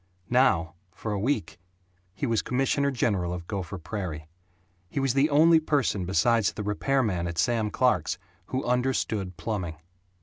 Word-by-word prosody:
Now, 90 -11 +3 0.2
for 110 - -4
a 100 - -1
week, 105 - -1 0.6
he 120 - -2
was 115 -4 +1
commissioner 135 +2 +1
general 100 -9 0
of 90 -1 -5
Gopher 95 -1 -4
Prairie. 85 -4 -5 0.6
He - - -2
was 135 -3 +1
the 140 +3 +3
only 160 +3 +6
person 140 - 0
besides 115 +2 +2
the 105 - -5
repairman 105 -4 0
at 85 -1 -5
Sam 115 -1 +1
Clark's 95 - +1 0.3
who 130 +1 -2
understood 120 -7 0
plumbing. 95 -8 -3
110 Hz, 145 wpm, -27 LUFS, 90-130 Hz, 0.6 s, only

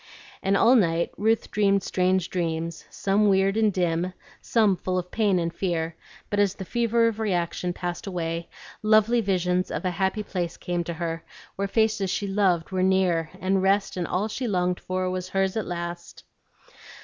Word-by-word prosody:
And 195 +1 +2
all 240 +5 +6
night 170 -6 +2
Ruth 220 +2 +1
dreamed 200 -2 +2
strange 185 -1 +1
dreams, 165 -1 -2
some 205 +1 +2
weird 195 0 +3
and 220 -1 +3
dim, 180 -1 0 0.3
some 215 -4 +3
full 185 +1 -2
of 180 0 -4
pain 205 -4 +2
and 170 -1 -1
fear; 165 -3 -2 0.4
but 205 - 0
as 200 -1 +2
the 190 - -7
fever 230 +2 +2
of 225 -1 -2
reaction 180 -4 -1
passed 175 +2 -5
away, 170 -2 -3 0.3
lovely 215 +2 +4
visions 180 -2 0
of - - -4
a 185 - +1
happy 190 +4 -1
place 180 -4 -3
came 175 -1 -2
to 170 - -4
her, 165 0 -3 0.3
where 200 +1 -1
faces 215 -1 +1
she 205 - -1
loved 195 -4 +1
were 185 -1 0
near, 185 -4 +2
and 190 0 +1
rest, 195 +1 +2
and 175 -3 -2
all 195 +4 0
she 240 +3 -3
longed 180 -3 0
for 185 0 -2
was 185 0 -3
hers 195 0 0
at 220 - -2
last. 170 0 -6
185 Hz, 180 wpm, -25 LUFS, 175-205 Hz, 0.4 s, all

